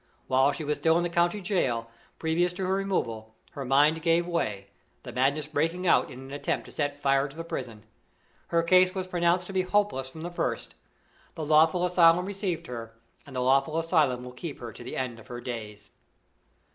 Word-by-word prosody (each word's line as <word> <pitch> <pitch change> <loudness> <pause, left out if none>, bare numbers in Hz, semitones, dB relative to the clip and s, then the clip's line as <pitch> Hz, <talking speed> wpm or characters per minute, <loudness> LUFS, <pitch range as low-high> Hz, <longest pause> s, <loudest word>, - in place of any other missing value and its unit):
While 130 +2 +3
she 145 - -5
was 150 0 -2
still 160 0 +3
in 175 - +1
the 175 - -2
county 175 +4 +2
jail, 130 - 0 0.3
previous 170 +2 +1
to 190 +1 -3
her 185 - +1
removal, 115 - -2 0.2
her 140 - -6
mind 145 +5 +3
gave 165 +1 +2
way, 105 - -2 0.3
the - - -7
madness 140 +4 +1
breaking 165 +4 -1
out - - +4
in 125 - -10
an 135 0 -10
attempt 145 - -2
to - - -12
set 145 -1 -2
fire 135 0 +2
to 140 - -14
the 165 - -4
prison. 115 -9 -6 0.6
Her 170 0 +2
case 185 +2 +4
was 190 -1 -2
pronounced 175 0 +1
to 195 - -8
be 190 - +2
hopeless 185 -9 0
from 160 +4 -10
the 175 - -5
first. 175 - -3 0.6
The 160 -3 -4
lawful 160 +4 +4
asylum 175 0 +5
received 195 -3 -3
her, 115 -2 -7 0.3
and 135 - -11
the 125 - 0
lawful 135 +5 +2
asylum 155 -7 +2
will 125 - -8
keep 140 +4 -7
her 120 -2 -7
to - - -11
the 125 - -6
end 125 -3 -3
of 110 - -15
her 120 -1 -6
days. 105 -4 -7
155 Hz, 205 wpm, -27 LUFS, 130-175 Hz, 0.6 s, asylum